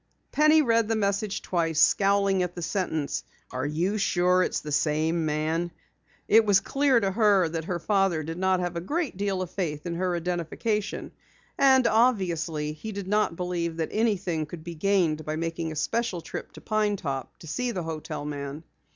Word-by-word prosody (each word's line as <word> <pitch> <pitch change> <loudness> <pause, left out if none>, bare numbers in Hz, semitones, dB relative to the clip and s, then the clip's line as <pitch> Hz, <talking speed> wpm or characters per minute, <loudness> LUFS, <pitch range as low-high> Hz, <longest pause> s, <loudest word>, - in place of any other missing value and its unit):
Penny 305 +1 +5
read 230 -3 +2
the 225 - +1
message 200 0 -1
twice, 165 -3 0
scowling 195 +2 +3
at 180 -1 -2
the 175 - -5
sentence: 160 -6 -2 0.3
"Are 130 +2 -2
you 175 +8 -1
sure 180 -1 +3
it - - +2
is - - -3
the 150 - -7
same 155 +2 +1
man?" 160 +3 -1 0.6
It 225 +1 +6
was 205 -2 +4
clear 275 0 +2
to 195 -3 0
her 200 -4 +4
that 160 -1 -4
her 180 0 -2
father 195 -3 +1
did 165 +3 -5
not 190 0 +2
have 175 -1 -3
a 170 - -2
great 305 - -2
deal 195 -1 -1
of 180 - -8
faith 160 -6 -3
in 170 - -2
her 180 +1 -1
identification. 180 +5 -2 0.4
And 265 -2 +5
obviously, 170 -11 +1
he 215 +8 -7
did 200 -2 -6
not 210 -3 +1
believe 170 -2 -2
that 160 - -1
anything 195 -8 0
could 160 0 -9
be 170 0 -6
gained 165 -3 +1
by 155 +1 -3
making 165 0 -3
a - - -6
special 210 +3 -1
trip - - -7
to - - -12
Pine 215 -2 +1
Top 135 -8 -5
to - - -13
see 245 +11 -2
the 185 -7 -3
hotel 155 -2 -5
man. 145 +1 -5
180 Hz, 190 wpm, -26 LUFS, 160-205 Hz, 0.6 s, It